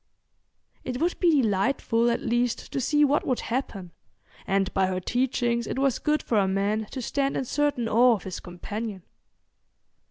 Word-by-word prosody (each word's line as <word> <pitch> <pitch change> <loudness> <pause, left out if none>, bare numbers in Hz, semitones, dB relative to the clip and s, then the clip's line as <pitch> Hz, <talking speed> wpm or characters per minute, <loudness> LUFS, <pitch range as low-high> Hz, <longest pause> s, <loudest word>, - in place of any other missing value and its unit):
It 250 -1 -4
would 345 +3 0
be 320 -7 +4
delightful 230 +3 +1
at 235 - 0
least 240 0 -1
to 270 - -2
see 295 +4 +3
what 285 +1 +2
would 255 - 0
happen, 205 -8 -4 0.6
and 195 0 0
by 190 -1 +2
her 185 -1 -2
teachings 240 +2 0
it - - -4
was 270 -2 +1
good 300 0 0
for 220 - +1
a 195 - +2
man 205 +3 0
to 260 -2 -6
stand 275 +2 -1
in 265 - -2
certain 285 -3 0
awe 240 +2 +5
of 200 - -8
his 185 -1 -6
companion. 200 +2 -6
235 Hz, 170 wpm, -26 LUFS, 200-270 Hz, 0.6 s, awe